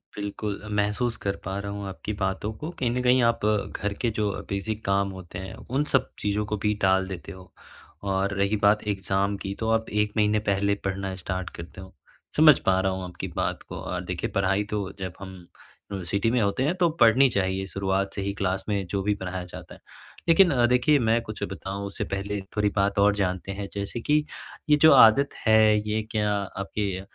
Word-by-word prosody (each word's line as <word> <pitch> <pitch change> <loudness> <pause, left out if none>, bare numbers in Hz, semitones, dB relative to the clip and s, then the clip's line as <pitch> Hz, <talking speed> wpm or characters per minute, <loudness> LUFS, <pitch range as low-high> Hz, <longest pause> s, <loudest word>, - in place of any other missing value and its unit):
बिल्कुल, 105 0 -4
महसूस 105 +3 0
कर 100 0 0
पा 95 +2 -3
रहा 100 0 -5
हूँ 100 -1 -5
आपकी 95 +2 -5
बातों 95 +2 -1
को 155 - -5
कहीं 125 -3 +1
न 125 +1 -1
कहीं 125 0 +4
आप 115 0 +2
घर 105 -1 -1
के 120 - +2
जो 105 -1 +1 0.2
बेसिक 105 +2 -3
काम 100 0 +1
होते 95 -1 -8
हैं। 95 0 -7
उन 135 +4 -2
सब 130 -1 +3
चीज़ों 105 +1 -1
को 105 +1 -2
भी 105 - +3
टाल 95 0 +3
देते 95 -3 -7
हो 95 -1 -13 0.6
और 95 0 0
रही 100 +2 +2
बात 105 +1 +4
एग्ज़ाम 100 0 0
की 100 0 -5
तो 110 - -1
आप 115 0 +1
1 105 0 -1
महीने 105 0 +3
पहले 100 +1 +2
पढ़ना 95 0 -2
स्टार्ट 95 0 -4
करते 85 +2 -9
हो। 95 - -12 0.4
समझ 155 -2 +8
पा 95 0 +3
रहा 95 0 +1
हूँ 95 0 -4
आपकी 90 -1 -6
बात - - -2
को - - -6
अ, - - -4
देखिये - - -4
पढ़ाई 100 +1 +1
तो 100 -2 -2
जब 95 -2 -4
हम 95 -1 -8 0.6
यूनिवर्सिटी 100 +3 -1
में 125 - +2
होते 100 +5 +1
हैं 150 +5 +2
तो 175 -2 +3
पढ़नी 120 +4 +7
चाहिए, 95 -3 0
शुरुआत 95 0 -1
से 100 - -4
ही 100 0 -2
क्लास 95 -1 -1
में 100 -2 0
जो 100 0 -1
भी 105 +1 +2
पढ़ाया 95 -1 -5
जाता 90 - -10
है। - - -18 0.5
लेकिन 180 +2 +7 0.2
देखिये 125 +4 +4
मैं 115 0 +2
कुछ 110 -2 -8
बताऊँ 95 +1 -5
उससे 100 - -4
पहले 100 +1 -2 0.2
थोड़ी 105 0 +2
बात 100 0 +1
और 100 0 +4
जानते 95 -1 -2
हैं। 100 0 -5
जैसे 100 +4 -4
कि 150 +4 +2 0.5
ये 150 - +7
जो 160 - +8
आदत 130 +5 +7 0.2
है 110 -1 +5
ये 110 +1 0
क्या 105 -1 +1
आपके 100 -1 -3
100 Hz, 205 wpm, -26 LUFS, 95-110 Hz, 0.6 s, समझ